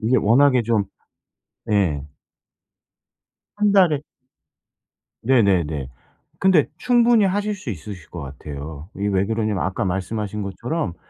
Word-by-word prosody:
이게 120 +3 +2
워낙에 130 +3 +4
좀 110 -2 +1 0.9
예. 90 -9 +1 1.5
1 210 -1 +2
달에 175 -8 +4 1.2
네네네. 90 - +2 0.5
근데 185 -6 +4
충분히 240 -3 +4
하실 205 +2 -1
수 185 -9 -10
있으실 90 -1 -8
거 85 - -7
같아요. 70 +2 -8
이게 100 +1 -1
왜 95 -1 +1
그러냐면 110 -3 -1
아까 95 +5 -2
말씀하신 100 +3 -3
것처럼 110 - -3
105 Hz, 235 characters per minute, -22 LUFS, 90-145 Hz, 1.5 s, 워낙에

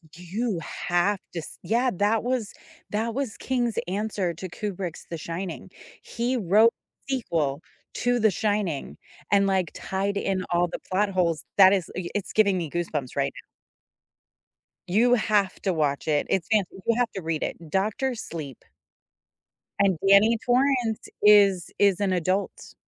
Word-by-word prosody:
you 185 +3 -3
have 175 +5 0
to 170 - -3
s 160 - -9
yeah, 245 +3 +2
that 210 +4 +1
was 245 -4 -2 0.4
that 225 +2 -1
was 270 -6 -2
King's 245 -3 -1
answer 200 -2 -2
to 185 +4 -6
Kubrick's 185 -2 -5
The 165 - -4
Shining. 170 +2 -6 0.3
He 245 +2 -2
wrote 215 +3 +5 0.4
a - - 0
sequel 155 - -1 0.3
to 245 0 +1
The 220 -1 +4
Shining 205 -6 -1 0.4
and 200 -1 +4
like 190 -4 0
tied 200 +1 -2
in 190 -2 -1
all 175 0 +3
the - - -6
plot 200 +2 +2
holes, 170 -4 0
that 195 0 +8
is 185 -3 -1
y 180 -1 -4
it's 205 - -3
giving 200 -3 +3
me 165 - -4
goosebumps 155 -6 -3
right 140 -1 0
now. - - -43 1.4
You 240 +6 +4
have 210 -4 +1
to 190 -3 +1
watch 145 -3 -1
it. 150 -2 +1
It's 190 -4 0
fan 215 -3 +4
you 225 +4 -1
have 245 -2 +1
to 195 - -6
read 160 -2 -2
it, 165 -2 -5
Doctor 215 - 0
Sleep. 155 - -7 1.2
And 195 -3 +3
Danny 210 +4 +6
Torrance 250 -3 +1
is 200 -3 +5
is 200 -3 +4
an 200 -2 +1
adult. 185 +3 -2
195 Hz, 155 wpm, -25 LUFS, 175-220 Hz, 1.4 s, that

